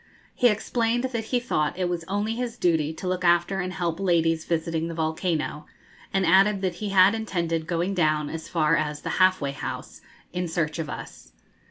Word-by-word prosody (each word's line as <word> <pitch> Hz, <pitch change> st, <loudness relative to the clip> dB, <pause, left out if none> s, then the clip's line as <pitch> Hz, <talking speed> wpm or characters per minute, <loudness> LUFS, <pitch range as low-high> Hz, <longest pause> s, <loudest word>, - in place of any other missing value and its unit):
He 245 Hz, -, +4 dB
explained 230 Hz, +2 st, 0 dB
that 235 Hz, -4 st, -2 dB
he 245 Hz, +2 st, +1 dB
thought 155 Hz, -, -1 dB
it 185 Hz, -1 st, 0 dB
was 175 Hz, -1 st, -2 dB
only 205 Hz, +4 st, -1 dB
his 240 Hz, 0 st, -4 dB
duty 160 Hz, -6 st, +1 dB
to 170 Hz, +3 st, -6 dB
look 185 Hz, 0 st, -1 dB
after 175 Hz, +2 st, +3 dB
and 185 Hz, 0 st, -2 dB
help 170 Hz, -2 st, -2 dB
ladies 165 Hz, -4 st, +2 dB
visiting 165 Hz, -1 st, -1 dB
the 165 Hz, -, -5 dB
volcano, 160 Hz, -1 st, -2 dB, 0.4 s
and 195 Hz, -1 st, +1 dB
added 195 Hz, +3 st, +4 dB
that 185 Hz, -2 st, 0 dB
he 210 Hz, -, -2 dB
had 195 Hz, +1 st, +6 dB
intended 170 Hz, -7 st, -2 dB
going 175 Hz, +3 st, -1 dB
down 155 Hz, -4 st, +1 dB
as 160 Hz, +1 st, -6 dB
far 165 Hz, -2 st, +2 dB
as 150 Hz, -2 st, -2 dB
the -, -, -2 dB
'Half 185 Hz, -1 st, +5 dB
way 140 Hz, -1 st, -1 dB
House' 140 Hz, -, -6 dB, 0.3 s
in 180 Hz, 0 st, -2 dB
search 160 Hz, -1 st, -2 dB
of 155 Hz, -2 st, -3 dB
us. -, -, -9 dB
175 Hz, 195 wpm, -25 LUFS, 160-195 Hz, 0.4 s, had